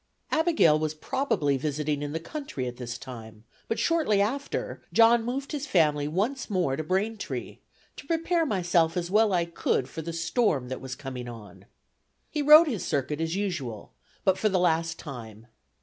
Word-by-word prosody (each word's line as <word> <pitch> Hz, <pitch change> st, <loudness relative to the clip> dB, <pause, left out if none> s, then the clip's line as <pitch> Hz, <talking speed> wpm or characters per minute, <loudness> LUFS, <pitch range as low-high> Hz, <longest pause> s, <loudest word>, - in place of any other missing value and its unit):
Abigail 315 Hz, -, +4 dB
was 155 Hz, 0 st, -2 dB
probably 155 Hz, -, 0 dB
visiting 150 Hz, +1 st, -2 dB
in 145 Hz, 0 st, -3 dB
the 160 Hz, -, -2 dB
country 165 Hz, -, -5 dB
at 125 Hz, -1 st, -5 dB
this 120 Hz, -1 st, -5 dB
time; 110 Hz, -4 st, -10 dB, 0.2 s
but 225 Hz, -, -1 dB
shortly 315 Hz, -12 st, +2 dB
after, 260 Hz, +8 st, -2 dB
John 230 Hz, 0 st, +5 dB
moved 265 Hz, +4 st, -3 dB
his 295 Hz, -1 st, -4 dB
family 150 Hz, -, +2 dB
once 215 Hz, -, -1 dB
more 180 Hz, -9 st, +1 dB
to 155 Hz, -, -3 dB
Braintree, 200 Hz, +6 st, -3 dB, 0.4 s
"to 275 Hz, -, -10 dB
prepare 330 Hz, +1 st, +1 dB
myself 175 Hz, -, +1 dB
as 175 Hz, 0 st, -2 dB
well 215 Hz, +1 st, +4 dB
as 185 Hz, -, +3 dB
I 170 Hz, -, +1 dB
could 170 Hz, -6 st, -1 dB
for 160 Hz, -, -6 dB
the 170 Hz, +2 st, -5 dB
storm 165 Hz, -, 0 dB
that 130 Hz, -, -5 dB
was 130 Hz, -1 st, -6 dB
coming 130 Hz, -3 st, -7 dB
on." 115 Hz, -3 st, -12 dB, 0.6 s
He 300 Hz, -, -1 dB
rode 305 Hz, +3 st, +9 dB
his 230 Hz, -, -2 dB
circuit 145 Hz, +2 st, -1 dB
as 165 Hz, +1 st, -1 dB
usual, 175 Hz, -, -4 dB, 0.3 s
but 190 Hz, -2 st, +2 dB
for 215 Hz, -, +2 dB
the 190 Hz, -, +1 dB
last 165 Hz, -2 st, +1 dB
time. 115 Hz, -6 st, -9 dB
170 Hz, 180 wpm, -27 LUFS, 140-225 Hz, 0.6 s, rode